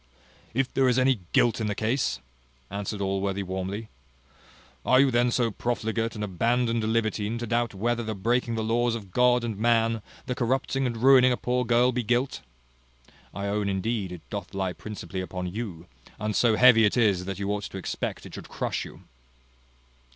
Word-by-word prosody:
"If 135 Hz, 0 st, 0 dB
there 135 Hz, -1 st, +3 dB
is 125 Hz, -, +2 dB
any 130 Hz, -2 st, +3 dB
guilt 120 Hz, -1 st, +3 dB
in 110 Hz, -, 0 dB
the 105 Hz, -, -1 dB
case!" 110 Hz, -, 0 dB, 0.5 s
answered 100 Hz, +1 st, -4 dB
Allworthy 100 Hz, 0 st, -1 dB
warmly: 95 Hz, +4 st, -4 dB, 1.0 s
"Are 130 Hz, -, +4 dB
you 135 Hz, -1 st, +5 dB
then 120 Hz, 0 st, +3 dB
so 120 Hz, -1 st, +1 dB
profligate 115 Hz, 0 st, -2 dB
and 105 Hz, -, -4 dB
abandoned 115 Hz, +4 st, 0 dB
a -, -, 0 dB
libertine 110 Hz, -1 st, 0 dB
to 120 Hz, -, -4 dB
doubt 120 Hz, -1 st, 0 dB
whether 120 Hz, +4 st, 0 dB
the 110 Hz, -1 st, -4 dB
breaking 115 Hz, +4 st, 0 dB
the 110 Hz, -, -1 dB
laws 115 Hz, +1 st, +1 dB
of 100 Hz, -5 st, -8 dB
God 125 Hz, +2 st, +3 dB
and 110 Hz, -4 st, -4 dB
man, 115 Hz, -1 st, +2 dB, 0.2 s
the 125 Hz, -, -2 dB
corrupting 130 Hz, +2 st, 0 dB
and 120 Hz, -2 st, -3 dB
ruining 130 Hz, -1 st, +7 dB
a 125 Hz, -, +1 dB
poor 125 Hz, 0 st, 0 dB
girl 120 Hz, +2 st, +4 dB
be 125 Hz, 0 st, -1 dB
guilt? 125 Hz, +4 st, 0 dB, 0.9 s
I 100 Hz, +1 st, -5 dB
own, 100 Hz, 0 st, 0 dB
indeed, 100 Hz, 0 st, -2 dB
it 85 Hz, -3 st, -10 dB
doth 100 Hz, -1 st, -6 dB
lie 95 Hz, -2 st, -1 dB
principally 95 Hz, -3 st, -6 dB
upon 90 Hz, -1 st, -5 dB
you; 100 Hz, -7 st, -5 dB, 0.3 s
and 105 Hz, 0 st, -2 dB
so 115 Hz, -3 st, +4 dB
heavy 125 Hz, -1 st, +7 dB
it 105 Hz, +3 st, +3 dB
is, 100 Hz, -6 st, +3 dB
that 95 Hz, -1 st, -4 dB
you 100 Hz, 0 st, -2 dB
ought 105 Hz, 0 st, -2 dB
to -, -, -7 dB
expect 95 Hz, -, -4 dB
it -, -, -11 dB
should -, -, -9 dB
crush -, -, -2 dB
you." -, -, -12 dB
115 Hz, 190 wpm, -26 LUFS, 100-120 Hz, 1.0 s, ruining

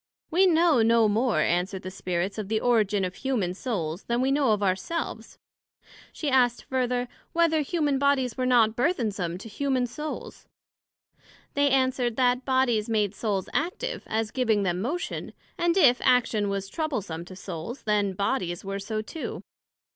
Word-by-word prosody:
We 375 Hz, +4 st, +5 dB
know 330 Hz, -6 st, +4 dB
no 230 Hz, 0 st, +4 dB
more, 215 Hz, -5 st, +2 dB
answered 180 Hz, +4 st, 0 dB
the 185 Hz, -, -6 dB
Spirits, 185 Hz, +2 st, -3 dB
of 210 Hz, -, -4 dB
the 220 Hz, +1 st, 0 dB
origin 215 Hz, -5 st, +2 dB
of 180 Hz, -, -4 dB
humane 220 Hz, -7 st, -1 dB
Souls, 185 Hz, -6 st, -4 dB
then 235 Hz, 0 st, 0 dB
we 260 Hz, +2 st, +2 dB
know 275 Hz, -4 st, +3 dB
of 205 Hz, -1 st, +1 dB
our 185 Hz, -2 st, +3 dB
Selves. 335 Hz, -, -5 dB, 0.7 s
she 305 Hz, -, -5 dB
asked 250 Hz, -3 st, +3 dB
further, 250 Hz, -1 st, -1 dB, 0.3 s
Whether 330 Hz, -2 st, +3 dB
humane 295 Hz, -2 st, 0 dB
bodies 270 Hz, -4 st, +2 dB
were 255 Hz, -1 st, -1 dB
not 230 Hz, -3 st, +4 dB
burthensome 215 Hz, -, -1 dB
to 200 Hz, -, -10 dB
humane 260 Hz, +2 st, 0 dB
Souls? 300 Hz, +5 st, -7 dB, 1.1 s
They 285 Hz, 0 st, +3 dB
answered, 260 Hz, -3 st, +1 dB
That 250 Hz, 0 st, +2 dB
Bodies, 250 Hz, -5 st, +1 dB
made 210 Hz, -3 st, +1 dB
Souls 200 Hz, -3 st, -2 dB
active, 380 Hz, +11 st, -2 dB
as 220 Hz, 0 st, -1 dB
giving 225 Hz, -6 st, +1 dB
them 180 Hz, -1 st, -1 dB
motion; 315 Hz, -, -3 dB, 0.2 s
and 345 Hz, +1 st, +1 dB
if 260 Hz, -9 st, +5 dB
action 225 Hz, -4 st, +3 dB
was 195 Hz, 0 st, -2 dB
troublesome 205 Hz, -, -3 dB
to 185 Hz, -, -11 dB
Souls, 190 Hz, -, -7 dB
then 205 Hz, -2 st, +1 dB
Bodies 185 Hz, -3 st, -2 dB
were 195 Hz, 0 st, -3 dB
so 215 Hz, +2 st, -3 dB
too. 320 Hz, +8 st, -6 dB
235 Hz, 160 wpm, -26 LUFS, 200-270 Hz, 1.1 s, We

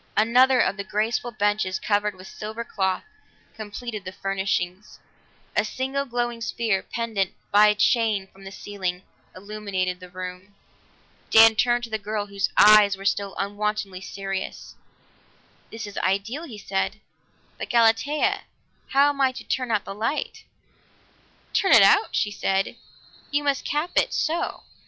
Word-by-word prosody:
Another 250 Hz, +4 st, +5 dB
of 200 Hz, -, +2 dB
the 200 Hz, -, -3 dB
graceful 215 Hz, +5 st, -1 dB
benches 205 Hz, -3 st, 0 dB
covered 205 Hz, -1 st, 0 dB
with 185 Hz, 0 st, -13 dB
the -, -, -12 dB
silver 220 Hz, +2 st, -5 dB
cloth 190 Hz, -5 st, -1 dB, 0.5 s
completed 215 Hz, 0 st, -7 dB
the 185 Hz, -, -6 dB
furnishings; 190 Hz, 0 st, -3 dB, 0.6 s
a -, -, +3 dB
single 265 Hz, +5 st, -2 dB
glowing 240 Hz, -2 st, -2 dB
sphere, 220 Hz, -3 st, 0 dB
pendant 220 Hz, -5 st, -2 dB, 0.2 s
by 210 Hz, +1 st, +7 dB
a 210 Hz, -, +3 dB
chain 215 Hz, -2 st, +2 dB
from 195 Hz, 0 st, -19 dB
the 195 Hz, -, -8 dB
ceiling, 190 Hz, -3 st, -5 dB, 0.3 s
illuminated 190 Hz, -2 st, -3 dB
the 180 Hz, -1 st, -11 dB
room. 185 Hz, +2 st, -8 dB, 0.7 s
Dan 225 Hz, 0 st, +8 dB
turned 240 Hz, +2 st, +2 dB
to 230 Hz, -, -6 dB
the 220 Hz, -, -1 dB
girl, 210 Hz, 0 st, -3 dB
whose 200 Hz, -1 st, -2 dB
eyes 210 Hz, -1 st, +7 dB
were 195 Hz, -, -10 dB
still 200 Hz, 0 st, 0 dB
unwontedly 205 Hz, -1 st, -3 dB
serious. 195 Hz, -1 st, -5 dB, 1.0 s
"This 225 Hz, -1 st, -7 dB
is 205 Hz, -1 st, -6 dB
ideal," 200 Hz, -, -1 dB
he 235 Hz, -9 st, -9 dB
said, 200 Hz, +1 st, -2 dB, 0.6 s
"but, -, -, -5 dB
Galatea, 285 Hz, -, +2 dB, 0.5 s
how 280 Hz, +2 st, +5 dB
am 280 Hz, -1 st, -2 dB
I 265 Hz, -1 st, +4 dB
to -, -, -8 dB
turn 255 Hz, -1 st, -2 dB
out 215 Hz, -3 st, 0 dB
the -, -, -6 dB
light?" 225 Hz, +9 st, -3 dB, 1.1 s
"Turn 385 Hz, -, +3 dB
it -, -, +9 dB
out?" 420 Hz, -, +4 dB
she 205 Hz, -, +1 dB
said. 195 Hz, -1 st, -1 dB, 0.5 s
"You 290 Hz, 0 st, 0 dB
must 280 Hz, -2 st, 0 dB
cap 300 Hz, +4 st, -1 dB
it -, -, +3 dB
so!" 325 Hz, +2 st, -1 dB
210 Hz, 150 wpm, -24 LUFS, 195-235 Hz, 1.1 s, it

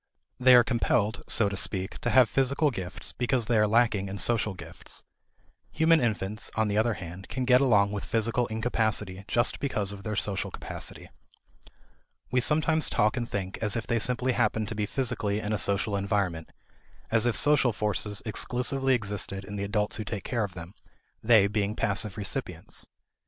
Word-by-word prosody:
They 130 Hz, 0 st, +7 dB
are 120 Hz, -, +7 dB
compelled, 115 Hz, -2 st, 0 dB
so 110 Hz, -, +4 dB
to 100 Hz, -, -3 dB
speak, 95 Hz, 0 st, -2 dB
to -, -, -1 dB
have 130 Hz, -2 st, +6 dB
physical 140 Hz, +4 st, +1 dB
gifts 95 Hz, -5 st, -4 dB
because 125 Hz, -1 st, 0 dB
they 120 Hz, -, 0 dB
are 105 Hz, -, +4 dB
lacking 110 Hz, -3 st, +2 dB
in 100 Hz, -, -5 dB
social 110 Hz, -2 st, +1 dB
gifts. -, -, -8 dB, 0.7 s
Human 160 Hz, 0 st, +4 dB
infants, 110 Hz, -2 st, -1 dB
on 110 Hz, -1 st, +1 dB
the 100 Hz, -, -1 dB
other 115 Hz, 0 st, +1 dB
hand, 90 Hz, +2 st, -9 dB
can 130 Hz, -1 st, -2 dB
get 125 Hz, +1 st, +5 dB
along 105 Hz, -7 st, +3 dB
with 105 Hz, -1 st, -4 dB
physical 115 Hz, +2 st, 0 dB
incapacity 110 Hz, -4 st, -1 dB
just 120 Hz, 0 st, +1 dB
because 105 Hz, -8 st, -1 dB
of 100 Hz, -1 st, -9 dB
their 110 Hz, +1 st, -4 dB
social 100 Hz, -1 st, -1 dB
capacity. -, -, -7 dB, 1.2 s
We 125 Hz, 0 st, +2 dB
sometimes 155 Hz, +3 st, +2 dB
talk 105 Hz, +3 st, +2 dB
and 120 Hz, -2 st, -3 dB
think 95 Hz, -1 st, -4 dB
as 105 Hz, -3 st, +1 dB
if 115 Hz, -, -3 dB
they 115 Hz, -, 0 dB
simply 125 Hz, +2 st, +1 dB
happened 110 Hz, -3 st, 0 dB
to 115 Hz, -, -5 dB
be 105 Hz, -1 st, -1 dB
physically 115 Hz, -6 st, -1 dB
in 105 Hz, 0 st, -3 dB
a 105 Hz, -, 0 dB
social 100 Hz, +2 st, +1 dB
environment; 100 Hz, -5 st, -1 dB, 0.6 s
as 115 Hz, +1 st, +3 dB
if 120 Hz, -, 0 dB
social 145 Hz, -4 st, +4 dB
forces 105 Hz, -1 st, -2 dB
exclusively 125 Hz, +4 st, 0 dB
existed 100 Hz, -3 st, -3 dB
in 105 Hz, -, -7 dB
the 100 Hz, -, -3 dB
adults 105 Hz, +1 st, -1 dB
who 110 Hz, -, -3 dB
take 105 Hz, -2 st, -5 dB
care 120 Hz, -3 st, -1 dB
of 100 Hz, -3 st, -5 dB
them, 85 Hz, +2 st, -9 dB, 0.5 s
they 110 Hz, -3 st, +5 dB
being 105 Hz, 0 st, -1 dB
passive 100 Hz, -1 st, -1 dB
recipients. 100 Hz, -2 st, -3 dB
110 Hz, 180 wpm, -27 LUFS, 100-120 Hz, 1.2 s, They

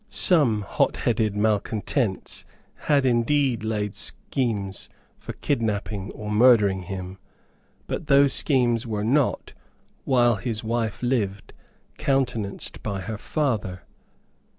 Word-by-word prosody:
Some 135 Hz, -, +4 dB
hotheaded 110 Hz, +1 st, 0 dB
malecontents 105 Hz, +1 st, -1 dB, 0.5 s
had 140 Hz, -3 st, +4 dB
indeed 125 Hz, 0 st, +2 dB
laid 105 Hz, -2 st, -2 dB
schemes 105 Hz, -7 st, -2 dB, 0.3 s
for -, -, -7 dB
kidnapping 105 Hz, -6 st, -2 dB
or 105 Hz, -1 st, -6 dB
murdering 105 Hz, -4 st, +5 dB
him; 95 Hz, +1 st, -7 dB, 0.7 s
but 160 Hz, -, -5 dB
those 140 Hz, -1 st, +5 dB
schemes 120 Hz, -4 st, +2 dB
were 105 Hz, -2 st, -2 dB
not, 135 Hz, +5 st, 0 dB, 0.5 s
while 120 Hz, -4 st, +3 dB
his 110 Hz, +3 st, -3 dB
wife 115 Hz, 0 st, -2 dB
lived, 105 Hz, -6 st, -1 dB, 0.5 s
countenanced 125 Hz, -7 st, -2 dB
by 100 Hz, -3 st, -4 dB
her 105 Hz, +3 st, -5 dB
father. 105 Hz, -, -2 dB
110 Hz, 105 wpm, -24 LUFS, 105-125 Hz, 0.7 s, murdering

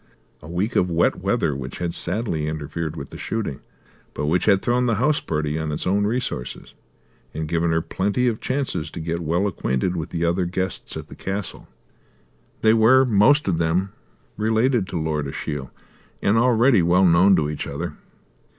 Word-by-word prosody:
A 75 Hz, -, -11 dB
week 95 Hz, +7 st, -2 dB
of 90 Hz, -, +2 dB
wet 85 Hz, 0 st, +2 dB
weather 70 Hz, -, 0 dB
which 65 Hz, -1 st, -6 dB
had 85 Hz, -1 st, -3 dB
sadly 85 Hz, -5 st, -1 dB
interfered 80 Hz, +1 st, -4 dB
with 70 Hz, -3 st, -7 dB
the -, -, -9 dB
shooting, 110 Hz, -12 st, -3 dB, 0.6 s
but -, -, -2 dB
which 85 Hz, +4 st, +1 dB
had 100 Hz, -2 st, +4 dB
thrown 125 Hz, +1 st, +1 dB
the 115 Hz, -, +2 dB
house 145 Hz, +7 st, +2 dB
party 75 Hz, 0 st, -2 dB
on 80 Hz, -1 st, -3 dB
its 75 Hz, -, -3 dB
own 100 Hz, +2 st, +2 dB
resources 115 Hz, -, -4 dB, 0.6 s
and 80 Hz, 0 st, -3 dB
given 85 Hz, +1 st, 0 dB
her 80 Hz, 0 st, +1 dB
plenty 100 Hz, +8 st, -1 dB
of 115 Hz, -3 st, 0 dB
chances 130 Hz, -, -2 dB
to -, -, -8 dB
get 85 Hz, +1 st, -2 dB
well 85 Hz, +4 st, 0 dB
acquainted 90 Hz, -3 st, -1 dB
with 85 Hz, 0 st, -4 dB
the 85 Hz, 0 st, -1 dB
other 85 Hz, +2 st, +1 dB
guests 95 Hz, +2 st, -3 dB
at -, -, -7 dB
the -, -, -11 dB
castle. 100 Hz, 0 st, -5 dB, 0.9 s
They 110 Hz, 0 st, +5 dB
were 120 Hz, +4 st, +5 dB
most 125 Hz, +7 st, +4 dB
of 85 Hz, -4 st, +1 dB
them 85 Hz, +4 st, 0 dB, 0.5 s
related 110 Hz, 0 st, +1 dB
to 85 Hz, -, -3 dB
Lord 75 Hz, -2 st, -1 dB
Ashiel 70 Hz, -1 st, -5 dB, 0.5 s
and 100 Hz, -, +2 dB
already 120 Hz, -1 st, +4 dB
well 90 Hz, +3 st, +4 dB
known 90 Hz, +3 st, +6 dB
to 75 Hz, -4 st, +1 dB
each 75 Hz, 0 st, -4 dB
other. -, -, -4 dB
90 Hz, 180 wpm, -23 LUFS, 80-110 Hz, 0.9 s, known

